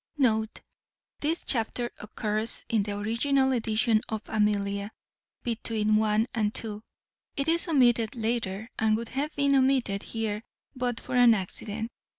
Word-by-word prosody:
[This 320 +3 -1
chapter 240 0 -1
occurs 215 +1 -2
in 225 -3 +2
the 205 0 -3
original 265 +6 +1
edition 225 -2 +2
of 220 -1 -3
Amelia, 205 -1 0 0.5
between 220 -2 0
1 215 0 +3
and 215 -3 +1
2. 215 -2 -4 0.6
It 275 +1 0
is 335 +2 +2
omitted 245 -6 +3
later, 225 -2 -2
and 220 -1 +3
would 230 0 -5
have 285 +3 -3
been 280 -1 +2
omitted 260 -7 +2
here 220 -2 -3 0.3
but 245 -2 -1
for - - -5
an 245 -2 +7
accident. 215 +3 -4
225 Hz, 135 wpm, -28 LUFS, 215-250 Hz, 0.6 s, an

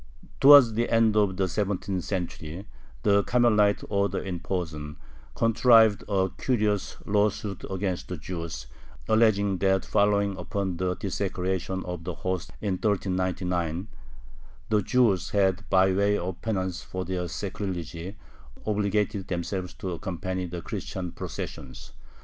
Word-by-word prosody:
Towards 140 -5 +9
the 115 +2 0
end 115 -2 +3
of 100 -3 +2
the 95 -1 +1
seventeenth 95 -1 -2
century 90 -1 -4 0.4
the 100 -1 +4
Carmelite 105 -4 +3
order 100 -1 0
in 90 -3 -3
Posen 80 -5 -4 0.4
contrived 115 -2 +5
a 95 -2 +1
curious 105 -6 0
lawsuit 105 -1 0
against 95 -1 -2
the 90 - -5
Jews, 85 -3 -6 0.4
alleging 100 -4 +3
that 95 +1 +2
following 100 -1 +2
upon 95 0 -3
the 90 0 -1
desecration 95 -1 -2
of 90 -2 -5
the 90 -1 -4
hosts 95 0 -3
in 100 -3 -1
1399 90 -3 -1 0.8
the 105 -1 +3
Jews 105 -4 +2
had, 95 -1 +1
by 95 0 +4
way 100 +2 +2
of 90 -1 -5
penance 95 -5 -2
for 95 0 -5
their 90 -1 -2
sacrilege, 90 -3 -4 0.7
obligated 105 -1 0
themselves 90 +1 -3
to 95 -3 -5
accompany 95 +1 -3
the 85 0 -6
Christian 90 -2 -5
processions. 65 -4 -7
95 Hz, 125 wpm, -27 LUFS, 90-105 Hz, 0.8 s, Towards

